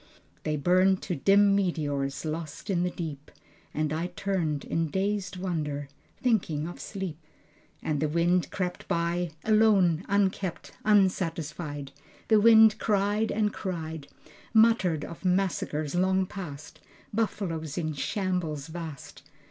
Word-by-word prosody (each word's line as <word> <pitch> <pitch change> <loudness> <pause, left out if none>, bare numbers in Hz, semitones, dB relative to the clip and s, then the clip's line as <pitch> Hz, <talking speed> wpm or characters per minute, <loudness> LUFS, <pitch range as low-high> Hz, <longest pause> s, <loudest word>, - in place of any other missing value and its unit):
They 155 - -1
burned 185 +5 +3
to 180 - -2
dim 200 +6 +5
meteors, 145 -7 -1
lost 155 +3 -4
in 175 -2 +1
the 180 - +1
deep. 155 -5 -6 0.4
And 155 0 -1
I 165 +3 -1
turned 175 -5 -2
in 165 -1 -1
dazed 195 +1 -1
wonder, 150 -6 -3 0.3
thinking 175 -11 0
of 175 - -8
sleep. 185 -6 -6 0.6
And 150 -2 -1
the 155 +1 0
wind 170 +3 +2
crept 180 -2 -4
by 170 +1 0
Alone, 205 -6 +4
unkempt, 195 -3 0
unsatisfied, 165 -8 0 0.4
The 220 -1 +6
wind 220 -1 +7
cried 205 +1 +1
and 210 -1 +1
cried 160 -5 -5 0.5
Muttered 220 -8 +4
of 170 - -10
massacres 180 -5 0
long 190 +1 +2
past, 160 -7 -8 0.3
Buffaloes 175 -8 -2
in 155 -3 -1
shambles 155 -1 -2
vast 160 -4 -8
175 Hz, 125 wpm, -28 LUFS, 155-195 Hz, 0.6 s, wind